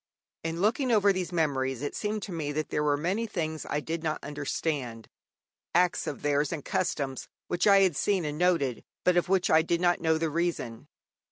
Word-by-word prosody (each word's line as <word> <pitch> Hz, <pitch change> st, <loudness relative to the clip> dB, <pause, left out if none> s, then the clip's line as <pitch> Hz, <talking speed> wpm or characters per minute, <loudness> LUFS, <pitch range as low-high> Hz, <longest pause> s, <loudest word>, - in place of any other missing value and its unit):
In 165 Hz, +1 st, -3 dB
looking 240 Hz, +5 st, +2 dB
over 205 Hz, -3 st, +5 dB
these 185 Hz, -1 st, -3 dB
memories 135 Hz, -6 st, 0 dB
it 145 Hz, -, -3 dB
seemed 210 Hz, -1 st, -2 dB
to 200 Hz, -, -6 dB
me 155 Hz, -4 st, -3 dB
that 155 Hz, +1 st, -2 dB
there -, -, 0 dB
were 145 Hz, -1 st, +2 dB
many 190 Hz, +9 st, -1 dB
things 160 Hz, -6 st, -3 dB
I 145 Hz, -, 0 dB
did 160 Hz, +2 st, -4 dB
not 155 Hz, -1 st, -1 dB
understand, 145 Hz, -5 st, -3 dB, 0.7 s
acts 180 Hz, 0 st, +2 dB
of 145 Hz, -, -5 dB
theirs 145 Hz, 0 st, +1 dB
and 155 Hz, -4 st, -5 dB
customs, 140 Hz, -7 st, -2 dB, 0.2 s
which 175 Hz, +3 st, +1 dB
I 200 Hz, -1 st, +7 dB
had 185 Hz, -5 st, +3 dB
seen 190 Hz, +1 st, +1 dB
and 150 Hz, +1 st, -4 dB
noted, 165 Hz, -9 st, +1 dB, 0.2 s
but 180 Hz, -, +3 dB
of 175 Hz, +1 st, +2 dB
which 190 Hz, -2 st, +2 dB
I 160 Hz, -, +6 dB
did 170 Hz, +1 st, 0 dB
not 175 Hz, 0 st, +2 dB
know 160 Hz, -1 st, +2 dB
the 160 Hz, -1 st, -1 dB
reason. 165 Hz, -9 st, -2 dB
165 Hz, 200 wpm, -28 LUFS, 145-180 Hz, 0.7 s, I